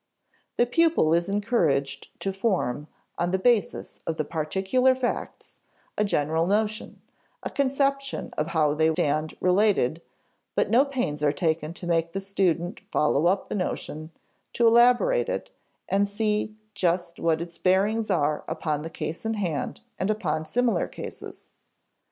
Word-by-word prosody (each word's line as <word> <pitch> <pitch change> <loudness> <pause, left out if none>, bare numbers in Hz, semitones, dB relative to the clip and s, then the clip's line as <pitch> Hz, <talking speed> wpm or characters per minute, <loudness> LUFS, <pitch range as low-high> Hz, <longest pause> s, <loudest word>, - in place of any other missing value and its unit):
The 240 - +4
pupil 315 - +3
is 170 +3 +1
encouraged 195 - 0
to 195 - -2
form, 180 - -1 0.3
on 175 - +1
the 190 - +1
basis 210 -1 0
of 160 - -2
the 155 - -1
particular 190 - +1
facts, 255 -1 -4 0.4
a 210 - +1
general 160 -3 +1
notion, 215 +2 -1 0.4
a - - -4
conception 275 0 0
of 150 - -1
how 155 -3 +2
they 160 +1 +3
stand 155 +1 -1
related; 180 - +2 0.5
but - - +1
no 250 +5 +5
pains 250 - -2
are 145 - +4
taken 160 0 -1
to 180 - -7
make 165 -1 0
the 195 - -1
student 190 -2 -1
follow 150 +2 +2
up 190 +2 +1
the - - -5
notion, 155 -5 -3 0.4
to 235 - +2
elaborate 245 - +4
it - - -3 0.4
and 200 +1 +2
see 210 +1 -1 0.2
just 175 -3 -1
what 165 -1 +1
its 170 0 -7
bearings 205 +4 +2
are 150 -2 +1
upon 150 -2 -2
the 160 - -6
case 165 0 -5
in 225 0 -1
hand 180 -1 -3 0.2
and 190 - 0
upon 160 -8 -1
similar 245 -1 +1
cases. - - -9
185 Hz, 150 wpm, -26 LUFS, 160-220 Hz, 0.5 s, no